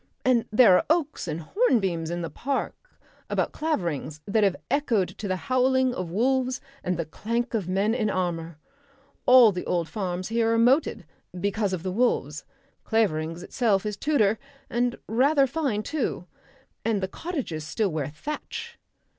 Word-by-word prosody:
And 250 -3 +3
there 215 -4 +7
are - - 0
oaks 315 - 0
and 160 +1 -3
hornbeams 190 - +1
in 175 0 -3
the 165 - -5
park 280 - -4 0.3
about - - 0
Claverings 170 - -2
that 215 +1 +2
have 195 -2 +3 0.2
echoed 250 -10 +1
to 205 - -7
the 185 - 0
howling 255 +3 +2
of 185 -7 -4
wolves 255 +6 +1 0.2
and 180 -1 -1
the 170 - -2
clank 235 - -3
of 210 -6 -1
men 195 +4 +1
in 220 -3 0
armour. 170 -4 -2 0.7
All 250 -3 +8
the 180 -2 -4
old 170 -2 0
farms 185 -2 -3
here 225 0 +2
are - - +2
moated 245 - +3 0.3
because 200 +1 0
of 180 -3 -3
the 185 - -2
wolves. 180 - 0 0.4
Claverings 165 -6 0
itself 215 -5 +1
is 210 -1 -2
Tudor, 220 -5 +2 0.3
and 240 0 0
rather 275 +5 +4
fine 265 -7 -1
too. 275 - -2 0.6
And 220 -2 +1
the 190 - -2
cottages 250 - -4
still 205 +6 -1
wear 155 -4 -2
thatch...." 300 - -6
215 Hz, 160 wpm, -26 LUFS, 180-255 Hz, 0.7 s, All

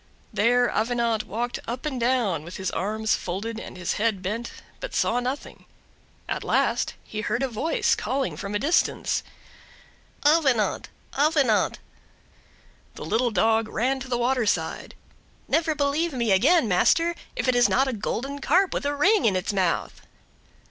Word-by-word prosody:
There 245 +3 +3
Avenant 230 -1 0
walked 240 +3 -3
up 245 +5 -5
and 270 -4 -2
down, 230 - +1
with 175 +3 -8
his 190 -1 -3
arms 220 +2 -1
folded 215 +6 -4
and 185 - -9
his 180 -1 -2
head 215 -4 0
bent, 230 +5 -3 0.3
but - - -6
saw 240 - +2
nothing. 255 +3 -5 0.6
At - - -3
last - - +1
he 215 - -5
heard 240 +4 -1
a - - +1
voice, 255 +7 0
calling 270 0 -2
from 200 0 -5
a - - +3
distance, 295 +10 +1 1.0
"Avenant, 285 -8 +2 0.3
Avenant!" 280 -7 +2 1.2
The - - -7
little 240 +2 +1
dog 225 0 +2
ran 260 +5 0
to 260 - -7
the 245 -1 -1
water 245 -1 +1
side.—"Never 315 +8 -3
believe 295 +3 0
me 235 -4 0
again, 240 - +4
master, 330 - +3 0.2
if - - -2
it 255 - +3
is 245 0 +4
not 270 +2 +2
a 265 - -1
golden 260 +6 -3
Carp 370 +7 +3
with 285 - -2
a 290 - -1
ring 390 +8 +3
in 205 -4 +3
its 185 +2 -1
mouth!" 185 -4 -1
240 Hz, 155 wpm, -25 LUFS, 215-275 Hz, 1.2 s, again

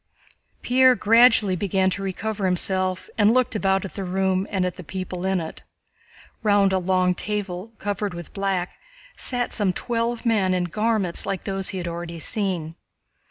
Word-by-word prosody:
Pierre 255 +1 +5
gradually 225 -3 +5
began 190 0 +1
to 195 - -3
recover 195 +1 -3
himself 185 0 +1
and 210 +1 +5
looked 255 -3 +2
about 195 -1 +1
at 195 - -8
the 195 - -5
room 190 +1 0
and 190 -2 0
at 180 - -3
the 180 - -9
people 185 +1 -5
in 190 -1 +1
it. 160 -1 -7 0.8
Round 205 -3 +3
a 190 - +2
long 185 0 +2
table 205 +1 -4
covered 205 -2 -3
with 170 -1 -9
black 195 -3 -2 0.4
sat 245 -1 -2
some 200 -4 +1
twelve 235 +3 -2
men 200 -5 +2
in 180 - 0
garments 210 0 0
like 190 - -2
those 195 -1 -2
he 190 - -4
had 175 -1 -4
already 170 0 -5
seen. 175 -4 -3
190 Hz, 165 wpm, -23 LUFS, 180-210 Hz, 0.8 s, Pierre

